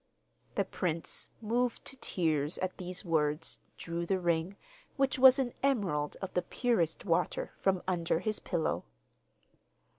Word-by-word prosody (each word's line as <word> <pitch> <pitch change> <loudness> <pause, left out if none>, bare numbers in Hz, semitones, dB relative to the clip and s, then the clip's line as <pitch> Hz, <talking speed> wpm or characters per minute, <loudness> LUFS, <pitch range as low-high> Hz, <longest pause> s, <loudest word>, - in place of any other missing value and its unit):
The - - +2
prince, 170 -3 -3
moved 240 +2 0
to 270 - -5
tears 160 - 0
at 185 0 -3
these 185 +2 -4
words, 155 -1 +1 0.2
drew 170 0 -3
the 195 - +2
ring, 175 +2 0 0.4
which 270 -1 +2
was 260 +1 +9
an 255 -3 0
emerald 195 - +1
of 190 - -4
the 180 - +2
purest 180 -4 0
water, 175 -1 +1
from 190 -2 +1
under 170 -3 +1
his 215 +4 -1
pillow. 155 - -1
180 Hz, 140 wpm, -32 LUFS, 165-220 Hz, 0.4 s, was